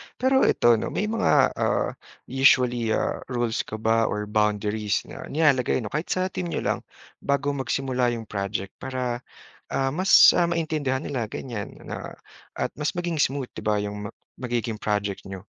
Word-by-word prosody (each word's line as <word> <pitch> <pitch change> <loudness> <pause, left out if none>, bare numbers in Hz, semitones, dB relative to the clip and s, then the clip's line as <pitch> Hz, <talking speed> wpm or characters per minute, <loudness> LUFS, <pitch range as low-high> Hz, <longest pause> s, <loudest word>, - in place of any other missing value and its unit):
Pero 265 +1 +3
ito 120 -2 +4
'no, - - -3
may 210 +2 -2
mga, 230 - +3
ah, - - +1 0.3
usually, 125 -3 +3
ah, - - -1
rules 120 -3 -1
ka - - -5
ba 110 +1 +2
or 105 0 -2
boundaries 105 -1 +1
na - - -9
nilalagay 135 -5 +2
'no, 105 - -6
kahit 150 +4 -2
sa 185 0 0
team 180 - -3
niyo - - -3
lang - - 0 0.4
bago 140 +1 0
magsimula 130 -2 0
'yong 115 - -6
project 100 -1 -4
para, 125 -2 -3 0.5
ah, 135 0 0
mas, 185 +7 +7
ah, 175 -1 +2
maintindihan 155 -5 -1
nila 120 -7 -2
ganiyan 110 -2 -6
na - - -7 0.4
at - - -2
mas 150 +3 -1
maging 175 -3 -2
smooth 135 -3 0
'di - - -9
ba, 105 0 +2
'yong 105 0 -3 0.3
magiging 120 -3 -2
project 105 -2 -2
niyo? 95 +1 -8
125 Hz, 165 wpm, -25 LUFS, 105-145 Hz, 0.5 s, mas